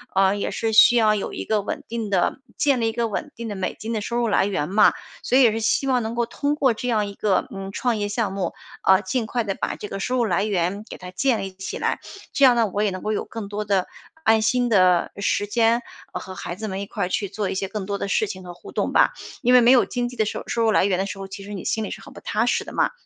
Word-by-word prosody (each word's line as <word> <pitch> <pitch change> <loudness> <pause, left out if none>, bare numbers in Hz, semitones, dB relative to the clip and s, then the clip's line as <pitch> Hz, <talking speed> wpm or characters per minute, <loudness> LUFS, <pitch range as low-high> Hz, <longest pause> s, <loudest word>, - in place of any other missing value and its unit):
呃 195 +1 +4
也 - - -2
是 225 -1 -1
需 230 +2 +8
要 215 -2 +4
有 200 - -4
一 - - -5
个 215 -1 +1
稳 - - -5
定 225 -3 -4
的 190 +6 +1 0.2
建 280 -3 +2
立 225 - +2
一 - - -2
个 235 0 0
稳 290 +8 -4
定 230 0 -6
的 205 - -4
美 190 -1 -3
金 225 - -5
的 220 - 0
收 235 +3 -3
入 240 -1 +1
来 195 - +3
源 180 -7 -1
嘛。 205 +3 +5 0.3
所 255 - +2
以 - - +6
也 235 -4 +6
是 225 - -2
希 230 +5 +1
望 255 -2 +2
能 225 +1 -4
够 235 - +1
通 285 +5 -1
过 270 -5 +3
这 235 +3 -5
样 220 -4 +1
一 200 - -8
个， 200 -3 +1
嗯 195 0 -6
创 240 0 0
业 205 -1 -1
项 210 -1 -1
目， 190 -3 -2 0.3
啊 190 +1 +5
尽 225 +5 -1
快 240 +2 -1
地 200 -2 -2
把 - - -3
这 210 - -8
个 195 - -5
收 250 +6 -1
入 240 - +2
来 195 0 +1
源 200 +1 -1
给 - - -7
它 180 0 -9
建 240 +5 +1
立 195 -1 -5
起 195 +1 -6
来。 - - -1 0.3
这 280 - +5
样 250 - +6
呢， 230 -2 +3
我 205 +2 -1
也 205 - +2
能 185 -1 -6
够 215 - -1
有 - - -1
更 225 -3 -7
多 210 +1 -3
的 195 -2 +1 0.4
安 220 0 +5
心 245 +3 +2
的 185 -5 +4
时 200 0 0
间， 230 +2 +2 0.3
呃 - - -4
和 190 0 -9
孩 175 - -5
子 220 - -4
们 195 -1 -4
一 - - -4
块 200 -1 -3
儿 180 - -5
去 200 0 -1
做 205 0 -3
一 - - -3
些 190 0 -2
更 210 -2 -4
多 200 +1 -2
的 200 - -3
事 215 - +1
情 190 -2 -7
和 175 -1 -8
互 175 - -13
动 - - -1
吧。 - - +4 0.3
因 245 - +3
为 250 - +8
没 240 +2 +6
有 255 - +6
经 245 -1 -2
济 250 - -12
的 215 - +2
收 210 - -4
收 230 - 0
入 220 - +3
来 - - +4
源 190 -2 +1
的 195 - 0
时 200 - -6
候， 195 0 -6
其 195 +1 -8
实 205 - -7
你 195 - -6
心 220 -1 -1
里 - - -5
是 - - -7
很 - - -13
不 - - -10
踏 220 +3 0
实 - - 0
的 - - -9
嘛。 - - +2
210 Hz, 330 characters per minute, -23 LUFS, 195-235 Hz, 0.4 s, 需